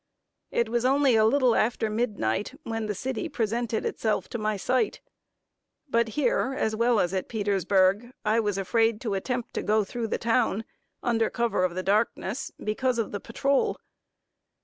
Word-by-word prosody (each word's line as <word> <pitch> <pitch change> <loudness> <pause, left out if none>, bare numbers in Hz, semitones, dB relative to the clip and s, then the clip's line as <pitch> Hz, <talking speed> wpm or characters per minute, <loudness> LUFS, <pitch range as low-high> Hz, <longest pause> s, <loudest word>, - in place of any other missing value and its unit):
It 235 - +1
was 235 +1 0
only 270 -1 +4
a 220 -1 +5
little 255 0 +4
after 225 0 +1
midnight, 215 - -1
when 225 -1 -3
the 210 - -2
city 260 +2 -3
presented 230 0 -1
itself 220 -1 -1
to 235 - -4
my 215 -1 -1
sight; 250 +6 0 0.9
but 235 -3 +2
here, 265 -1 +1
as 220 0 0
well 235 0 +3
as 180 0 +1
at 190 -1 -2
Petersburg, 200 +1 +2
I 215 +2 +3
was 205 -3 0
afraid 225 +3 +1
to 220 -4 -2
attempt 240 +5 -3
to - - -2
go 215 0 +2
through 230 +3 -4
the - - -1
town, 225 -2 +1 0.4
under 225 -2 +1
cover 235 -6 0
of 180 -1 0
the 185 - -2
darkness, 215 +4 0
because 245 +4 -1
of 230 - -1
the 205 - -3
patrol. 275 +6 0
225 Hz, 170 wpm, -27 LUFS, 210-240 Hz, 0.9 s, a